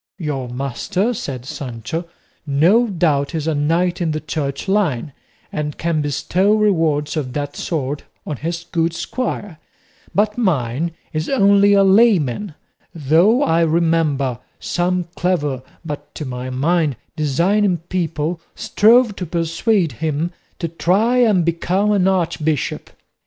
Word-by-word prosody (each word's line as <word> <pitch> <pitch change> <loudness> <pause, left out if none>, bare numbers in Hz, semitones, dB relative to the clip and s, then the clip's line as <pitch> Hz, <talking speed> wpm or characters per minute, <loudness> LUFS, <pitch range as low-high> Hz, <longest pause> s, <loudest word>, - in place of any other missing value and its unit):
"Your 145 -8 -3
master," 140 - -1
said 130 - -5
Sancho, 130 +5 -5 0.4
"no 175 +12 +4
doubt 165 -6 0
is 155 -2 -2
a 160 - +1
knight 170 +5 +1
in 170 - +1
the 155 - -2
Church 145 -2 -4
line, 165 - 0 0.4
and 150 -1 -3
can 165 -2 0
bestow 180 +8 +1
rewards 165 -9 +1
of 135 -5 -3
that 145 -1 -3
sort 145 -5 -3 0.2
on 150 - -4
his 170 +4 -4
good 165 -1 +1
squire; 205 -7 -4 0.6
but 210 +3 +1
mine 155 - 0 0.2
is 155 0 -2
only 200 -5 +5
a 200 -1 +5
layman; 195 - +3 0.4
though 170 - +3
I 165 -6 +2
remember 160 -6 +1 0.2
some 180 +1 0
clever, 150 -8 0 0.2
but, 150 -2 -7
to 155 - -5
my 125 0 -5
mind, 150 +2 +1 0.2
designing 175 +6 +2
people, 165 -1 -3
strove 230 +1 +4
to 180 - -4
persuade 170 +3 0
him 155 +7 -2 0.3
to 170 - -2
try 190 +9 +1
and 210 -8 +4
become 180 +5 +1
an 195 -3 +3
archbishop. 165 -6 -1
165 Hz, 130 wpm, -19 LUFS, 145-190 Hz, 0.6 s, only